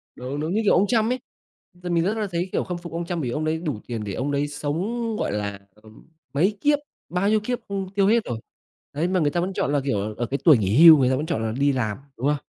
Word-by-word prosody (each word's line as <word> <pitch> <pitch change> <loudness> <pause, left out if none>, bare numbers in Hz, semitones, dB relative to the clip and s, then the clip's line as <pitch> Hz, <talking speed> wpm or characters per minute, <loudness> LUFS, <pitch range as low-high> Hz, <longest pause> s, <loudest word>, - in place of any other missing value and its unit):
Đúng, 130 +3 -5
đúng. 155 +4 -2
Như, 220 - +1
kiểu, 205 - +4
ông 195 +3 +3
Trump 225 +1 +2
ấy, 255 - -1 0.7
mình 170 -1 +2
rất 205 +5 0
là 215 -2 -1
thấy, 175 +2 -2
kiểu, - - 0
khâm 180 -1 -4
phục 170 0 -9
ông 170 +1 -3
Trump 170 -1 -3
bởi 125 - -2
vì - - -3
ông 155 +1 -2
ấy 155 +1 0
đủ 150 -10 -3
tiền 115 -3 -4
để 100 -2 -5
ông 135 +8 -2
đấy 145 +1 0
sống, 185 +11 -3
gọi - - -1
là, 100 -1 -3 0.2
ờm, 110 0 -18 0.3
mấy 190 +9 +1
kiếp 290 0 +3 0.3
bao 185 +3 +1
nhiêu 215 - +3
kiếp 245 +4 -3
không 195 -2 -3
tiêu 195 -1 +3
hết 230 +2 +3
rồi. 115 -2 -4 0.5
Đấy, 155 +5 0
mà 185 0 +1
người 150 -3 +2
ta 175 - 0
vẫn 185 +2 -2
chọn 145 - -1
là, 145 - +3
kiểu, 105 -5 -1
ở 120 - -1
cái 135 +4 -2
tuổi 155 -6 +7
nghỉ 110 - +4
hưu, 160 -2 +11
người 130 -3 +3
ta 130 - +2
vẫn 145 +4 -2
chọn 135 -9 -2
là 110 - -1
đi 140 +5 +2
làm, 110 -6 -1 0.2
đúng 130 +5 -1
không? 150 - +2
155 Hz, 290 wpm, -24 LUFS, 130-190 Hz, 0.7 s, hưu